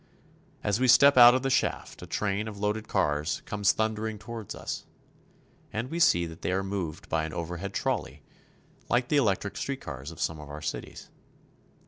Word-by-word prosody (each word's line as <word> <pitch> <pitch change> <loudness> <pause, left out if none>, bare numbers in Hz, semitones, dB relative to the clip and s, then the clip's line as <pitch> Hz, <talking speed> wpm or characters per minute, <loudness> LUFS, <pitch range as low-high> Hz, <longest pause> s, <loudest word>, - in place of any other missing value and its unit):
As 105 +1 +1
we 130 - +3
step 140 +3 +7
out 120 0 +9
of 130 - 0
the 135 - 0
shaft - - -1
a - - -8
train 105 +1 -1
of 105 -2 -7
loaded 105 +1 -2
cars 75 +2 0
comes 105 -1 +2
thundering 110 0 -2
toward 110 0 -7
us, - - -6 0.8
and 115 +5 -4
we 170 - -2
see 85 - +4
that 80 0 -10
they - - -1
are 95 +1 0
moved 95 -5 -4
by 80 -1 0
an 80 0 -5
overhead 90 +3 -4
trolley 100 - -2 0.7
like 120 0 +1
the 150 - +3
electric 100 -6 +1
street 135 -1 -3
cars 70 +2 -7
of 85 - -11
some 80 -1 -2
of 75 -1 -10
our 75 +1 -7
cities. - - -6
100 Hz, 185 wpm, -28 LUFS, 85-120 Hz, 0.8 s, out